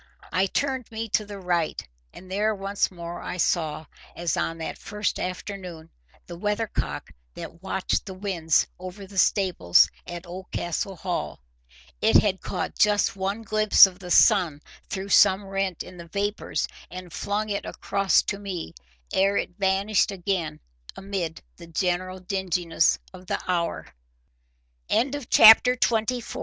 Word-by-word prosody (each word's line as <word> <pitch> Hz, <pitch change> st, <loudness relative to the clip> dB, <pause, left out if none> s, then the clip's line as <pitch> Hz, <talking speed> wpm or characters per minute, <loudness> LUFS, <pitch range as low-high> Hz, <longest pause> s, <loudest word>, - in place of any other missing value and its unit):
I 185 Hz, +3 st, +2 dB
turned 260 Hz, +2 st, -2 dB
me 225 Hz, 0 st, -4 dB
to 210 Hz, +1 st, +1 dB
the 205 Hz, -1 st, -7 dB
right, 175 Hz, -, -1 dB, 0.2 s
and 185 Hz, +1 st, -13 dB
there 210 Hz, +2 st, +1 dB
once 195 Hz, 0 st, -1 dB
more 175 Hz, -1 st, -7 dB
I -, -, -5 dB
saw, 160 Hz, -3 st, 0 dB, 0.3 s
as 170 Hz, -2 st, -1 dB
on 165 Hz, -, -2 dB
that 160 Hz, -, -6 dB
first 210 Hz, 0 st, -3 dB
afternoon, 180 Hz, -3 st, -6 dB, 0.3 s
the 175 Hz, -, -8 dB
weathercock 210 Hz, -, -2 dB, 0.2 s
that 170 Hz, -, -9 dB
watched 190 Hz, +1 st, -2 dB
the 190 Hz, -, -6 dB
winds 180 Hz, -5 st, +1 dB
over 185 Hz, +2 st, -8 dB
the 195 Hz, 0 st, -4 dB
stables 180 Hz, -, +4 dB, 0.2 s
at 175 Hz, +1 st, -7 dB
Oldcastle 180 Hz, +1 st, -4 dB
Hall. 180 Hz, +1 st, -4 dB, 0.6 s
It 110 Hz, -, +3 dB
had 190 Hz, -3 st, 0 dB
caught -, -, -4 dB
just 210 Hz, -1 st, +3 dB
one 195 Hz, +3 st, -3 dB
glimpse 215 Hz, -1 st, +7 dB
of 185 Hz, -2 st, -7 dB
the 180 Hz, -2 st, -9 dB
sun 175 Hz, -7 st, +4 dB, 0.3 s
through 195 Hz, 0 st, -4 dB
some 195 Hz, 0 st, +5 dB
rent 195 Hz, -2 st, -2 dB
in 180 Hz, 0 st, -12 dB
the 170 Hz, -1 st, -10 dB
vapours, 205 Hz, +4 st, -2 dB, 0.2 s
and 180 Hz, -2 st, -9 dB
flung 210 Hz, +4 st, -2 dB
it 200 Hz, -1 st, -2 dB
across 195 Hz, -1 st, +1 dB
to 195 Hz, -, -3 dB
me, 185 Hz, -, -5 dB, 0.4 s
ere 195 Hz, +1 st, +3 dB
it 175 Hz, -, -3 dB
vanished 195 Hz, +2 st, +2 dB
again 180 Hz, -5 st, -3 dB, 0.4 s
amid 190 Hz, -5 st, -4 dB
the 170 Hz, -, -12 dB
general 185 Hz, +2 st, -1 dB
dingine 180 Hz, -3 st, -3 dB
190 Hz, 130 wpm, -25 LUFS, 175-200 Hz, 0.6 s, glimpse